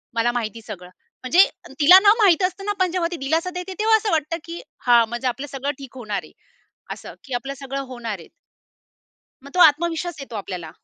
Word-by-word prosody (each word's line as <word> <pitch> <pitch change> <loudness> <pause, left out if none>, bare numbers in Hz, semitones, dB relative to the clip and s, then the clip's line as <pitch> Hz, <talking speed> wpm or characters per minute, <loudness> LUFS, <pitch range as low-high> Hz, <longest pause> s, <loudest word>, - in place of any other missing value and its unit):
मला 235 +1 +2
माहिती 230 -2 -4
सगळं." 180 -4 -8 0.3
म्हणजे 345 +10 +6 0.3
तिला 360 +6 +9
ना 410 +1 +6
माहित 365 -1 +5
असतं 385 +2 -10
ना, 415 - 0
पण 370 -2 +2
जेव्हा 350 -2 0
ती 345 - -4
दिलासा 325 +5 0
देते 375 +1 -6
तेव्हा 440 +1 +4
असं 425 -1 -2
वाटतं, 320 +1 0
की 335 0 -8 0.3
हा 240 -1 +7
म्हणजे 240 +3 -4
आपलं 260 +4 -3
सगळं 275 +2 -2
ठीक 265 -1 -11
होणार 215 -5 -4
आहे. - - -15 0.6
असं - - -11
की 270 - -9
आपलं 270 +3 -3
सगळं 275 0 -4
होणार 235 -6 -6
आहे 165 - -13 1.2
मग 280 - -11
तो 360 - +1
आत्मविश्वास 330 +1 +3
येतो 255 -5 -7
आपल्याला. 180 -5 -6
275 Hz, 200 wpm, -22 LUFS, 240-350 Hz, 1.2 s, तिला